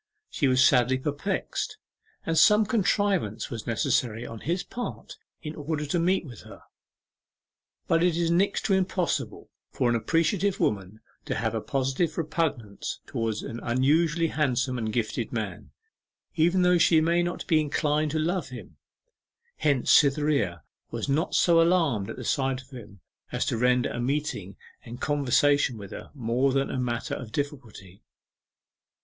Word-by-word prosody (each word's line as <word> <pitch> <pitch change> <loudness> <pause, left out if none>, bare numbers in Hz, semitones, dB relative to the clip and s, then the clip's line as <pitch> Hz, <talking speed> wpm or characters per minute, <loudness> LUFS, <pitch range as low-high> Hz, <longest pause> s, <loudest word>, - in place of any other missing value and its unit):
She 145 - +1
was 130 0 +4
sadly 125 0 +4
perplexed, 150 - -3 0.5
and 165 - 0
some 210 +6 +6
contrivance 200 - 0
was 115 -3 -6
necessary 115 0 0
on 115 - -8
his 175 - -2
part 245 - -7 0.3
in 150 -1 -5
order 150 0 -3
to 160 +4 0
meet 180 +1 +1
with 120 -7 -10
her. - - -14 1.2
But 165 0 +3
it 175 -2 +2
is 170 -1 +1
next 195 +4 +1
to 200 - +2
impossible 180 - -1 0.2
for 120 - 0
an - - +2
appreciative 170 - +1
woman 100 +1 -1 0.2
to - - -2
have - - -1
a - - -2
positive 135 +5 -1
repugnance 145 - -2
towards 115 -2 -3
an 115 - -6
unusually 155 +7 +2
handsome 130 -4 0
and 110 -1 -2
gifted 115 +1 -2
man, 110 -6 -5 0.7
even 175 +3 +3
though 180 -1 +4
she 165 -1 +5
may 170 +2 +2
not 175 0 -3
be 160 -4 +3
inclined 150 0 0
to 155 - -2
love 175 +4 -1
him. - - -10 0.8
Hence 140 -5 +1
Cytherea 140 - +3 0.3
was - - -4
not 155 +5 0
so 170 -1 +5
alarmed 165 - +2
at - - -5
the - - -8
sight 135 -2 0
of 135 - -25
him 105 -7 -11 0.3
as - - -1
to - - -1
render 125 +2 +2
a - - -4
meeting 125 -8 -2 0.3
and 120 +1 -9
conversation 145 -2 +2
with 100 -3 -10
her - - -8
more 125 +1 +1
than 135 0 0
a 130 - -2
matter 120 -2 -2
of 120 -4 -6
difficulty. 120 -10 -6
140 Hz, 155 wpm, -26 LUFS, 120-165 Hz, 1.2 s, some